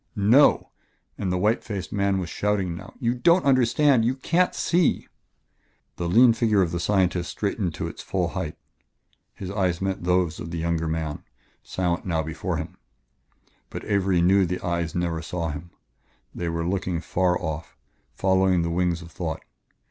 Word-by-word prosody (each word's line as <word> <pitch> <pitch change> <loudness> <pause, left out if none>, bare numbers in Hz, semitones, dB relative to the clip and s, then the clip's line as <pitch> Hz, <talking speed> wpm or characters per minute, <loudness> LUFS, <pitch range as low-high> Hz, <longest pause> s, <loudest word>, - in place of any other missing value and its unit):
"No!" 110 +8 +4 0.4
and 95 -3 -2
the 90 - 0
white 105 +5 +1
faced 100 -5 -5
man 100 -1 +1
was 90 -2 -3
shouting 100 -2 -1
now 100 +3 -11
"you 120 -2 +1
don't 170 +8 +3
understand 130 0 +4
you 125 +3 +1
can't 170 +7 +1
see 175 -1 +1 0.5
" - - -43
The 85 -1 -2
lean 115 +5 +6
figure 110 -3 +2
of 85 - -2
the 85 - -2
scientist 90 -2 +1
straightened 100 -5 -2
to - - -3
its - - -8
full - - -1
height. - - -4 0.8
His 95 -1 -6
eyes 90 -4 0
met 95 -2 -2
those 90 -2 +1
of 80 - -6
the 85 - -4
younger 80 0 -1
man, 80 -2 -3 0.4
silent 90 -2 -2
now 80 -3 -1
before 80 +3 -3
him, 80 +2 -6 0.9
but - - -7
Avery 95 -4 +2
knew 95 +1 +4
the 90 +2 -4
eyes 85 -2 -2
never 85 -2 -1
saw 85 0 -3
him; 75 +4 -8 0.6
they 85 -1 -3
were 85 0 -2
looking 90 -2 -1
far 90 +1 0
off, 80 -2 -5 0.4
following 95 -2 +2
the 85 - -2
wings 85 0 0
of 85 - -13
thought. 80 -3 -4
90 Hz, 170 wpm, -25 LUFS, 85-100 Hz, 0.9 s, lean